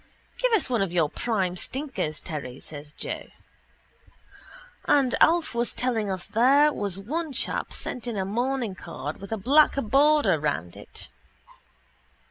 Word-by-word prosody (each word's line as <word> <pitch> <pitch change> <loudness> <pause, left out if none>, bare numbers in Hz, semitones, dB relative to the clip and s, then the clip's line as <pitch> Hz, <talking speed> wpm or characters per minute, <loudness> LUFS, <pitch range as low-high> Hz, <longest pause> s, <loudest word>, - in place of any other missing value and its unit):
—Give - - +2
us 430 - +3
one 240 -5 0
of 195 -3 0
your 165 -4 +2
prime 195 -6 -1
stinkers, 190 - -4
Terry, 140 -6 -5
says 145 -1 -9
Joe. - - -5 1.6
And 270 -4 +3
Alf 335 -2 +4
was 235 0 -1
telling 230 -5 0
us 185 -2 -3
there 280 +6 +4
was 200 -5 -2
one 300 +9 -3
chap - - -2
sent 250 -1 -6
in 230 -3 -3
a 190 - -1
mourning 240 +1 -1
card 165 -4 -6
with 195 - -9
a 225 - -1
black 280 +9 +4
border 275 - +3
round 90 - -2
it. - - -10
225 Hz, 145 wpm, -26 LUFS, 180-270 Hz, 1.6 s, Alf